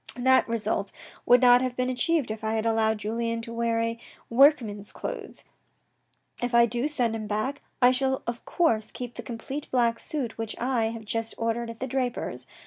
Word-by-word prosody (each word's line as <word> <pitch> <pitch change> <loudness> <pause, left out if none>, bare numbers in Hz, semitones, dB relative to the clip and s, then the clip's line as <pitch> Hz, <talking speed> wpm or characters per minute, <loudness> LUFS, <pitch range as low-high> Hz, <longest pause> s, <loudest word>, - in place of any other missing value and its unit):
That 260 +1 +4
result 210 -3 -1 0.4
would 245 +1 +6
not 245 0 +7
have 255 -1 -2
been 255 0 0
achieved 270 0 +1
if 220 0 -6
I 220 0 0
had 220 0 -1
allowed 220 -1 +2
Julien 230 +2 -2
to 230 - -7
wear 230 0 0
a 230 0 -1 0.3
workman's 230 -6 +4
clothes. - - -6 1.0
If 245 0 -1
I 235 0 +7
do 240 +4 -1
send 245 -7 0
him 215 -1 -5
back, 215 +7 -2 0.2
I 245 - +8
shall 265 +1 0
of 235 0 -4
course 225 -12 +1
keep 245 -1 -7
the - - -7
complete 265 +5 -6
black 235 -2 +2
suit 265 -9 -4
which 225 -1 -3
I 245 -2 +1
have 225 0 -5
just 225 +1 -2
ordered 230 +1 -1
at 230 0 -8
the - - 0
draper's. 255 -1 -3
235 Hz, 190 wpm, -27 LUFS, 225-255 Hz, 1.0 s, I